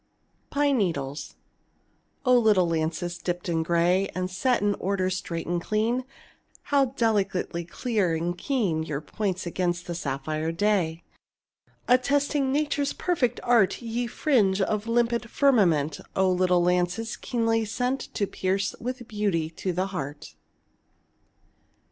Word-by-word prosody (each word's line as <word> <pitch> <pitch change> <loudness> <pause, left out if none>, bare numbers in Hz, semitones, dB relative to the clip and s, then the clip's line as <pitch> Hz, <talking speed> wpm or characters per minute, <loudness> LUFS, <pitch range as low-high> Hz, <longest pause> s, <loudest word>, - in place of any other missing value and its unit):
PINE 285 -2 +2
NEEDLES 145 -7 -2 0.9
O 250 0 +5
little 215 -7 +4
lances, 165 +2 -2
dipped 175 0 -3
in 165 -2 +1
grey, 175 +3 +2
And 185 0 -2
set 250 +7 +1
in 205 0 +3
order 185 -1 0
straight 170 -2 -3
and 175 0 -1
clean, 225 +6 0 0.6
How 280 -1 +3
delicately 205 -8 0
clear 195 -2 0
and 170 +2 -2
keen 195 - 0
Your 150 -3 -3
points 185 +4 -3
against 175 0 -1
the 175 - -4
sapphire 155 +1 -2
day! 170 -3 0 0.8
Attesting 275 +2 +2
Nature's 290 0 0
perfect 260 -10 0
art 235 -6 +3
Ye 235 +1 -2
fringe 225 -8 +2
the 205 +2 +1
limpid 235 0 +1
firmament, 175 - +3 0.2
O 190 -1 +3
little 180 -1 +3
lances, 180 +5 0
keenly 225 -2 0
sent 250 +5 -1 0.2
To 205 - +1
pierce 190 0 -1
with 250 0 -5
beauty 200 -7 -1
to 185 +3 -3
the 180 +2 0
heart! 145 - -6
190 Hz, 130 wpm, -26 LUFS, 170-235 Hz, 0.9 s, O